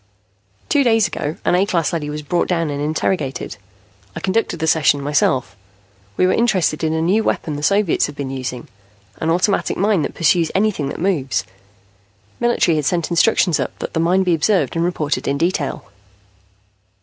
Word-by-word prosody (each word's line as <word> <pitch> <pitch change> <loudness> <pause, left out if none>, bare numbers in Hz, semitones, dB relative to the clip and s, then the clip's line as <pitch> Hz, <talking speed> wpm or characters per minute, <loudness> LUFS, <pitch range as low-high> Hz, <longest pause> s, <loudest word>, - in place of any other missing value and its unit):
"Two 285 - +3
days 225 -4 +3
ago, 150 +2 -4
an - - +2
A 180 +2 +4
class 175 -5 0
leady 150 -3 -2
was 150 0 -5
brought 170 +4 0
down 165 -4 0
and 145 0 -3
interrogated. 150 - -2 0.6
I - - -4
conducted 195 -2 -1
the 160 - -2
session 155 -2 +3
myself. 140 -6 0 0.6
We - - +3
were 185 - +3
interested 185 -9 +1
in 160 0 +1
a 160 0 0
new 200 +6 +2
weapon 155 -7 -2
the 145 - -5
Soviets 200 +2 +2
have 145 - -9
been 140 -2 -5
using, 125 -2 -5 0.5
an 160 - -2
automatic 180 +4 +1
mine 200 -2 +2
that 140 - -4
pursues 170 0 +2
anything 190 -8 +1
that - - -6
moves. 145 - 0 1.0
Military 235 -9 +2
had 150 - -1
sent 170 +2 0
instructions 175 -1 +3
up - - -3
that - - -6
the - - -1
mine 180 +3 +2
be 180 -2 +2
observed 180 +5 +1
and 165 - +1
reported 160 -4 -2
in 140 - 0
detail. 165 -3 -1
165 Hz, 180 wpm, -19 LUFS, 150-185 Hz, 1.0 s, A